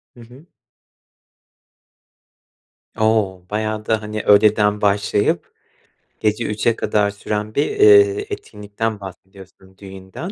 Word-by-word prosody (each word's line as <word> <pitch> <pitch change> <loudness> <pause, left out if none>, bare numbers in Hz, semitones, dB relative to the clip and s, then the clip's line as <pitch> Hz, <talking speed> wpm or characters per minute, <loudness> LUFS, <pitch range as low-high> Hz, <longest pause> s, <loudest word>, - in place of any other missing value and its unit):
Hı - - -17
hı. 125 +7 -16 2.5
O, 110 -4 +1
bayağı 110 0 -3
da, 110 -1 0
hani, 105 0 -5
öğleden 105 0 +3
başlayıp, 100 0 0 0.7
gece 110 +2 0
03.00'e 110 +2 0
kadar 105 -2 0
süren 105 +1 -5
bir, 145 - +2
eee, 410 -1 +4
etkinlikten 110 - -5
bahsediyorsun, 95 0 -14
düğünden, 95 - -9
105 Hz, 100 wpm, -19 LUFS, 100-115 Hz, 2.5 s, eee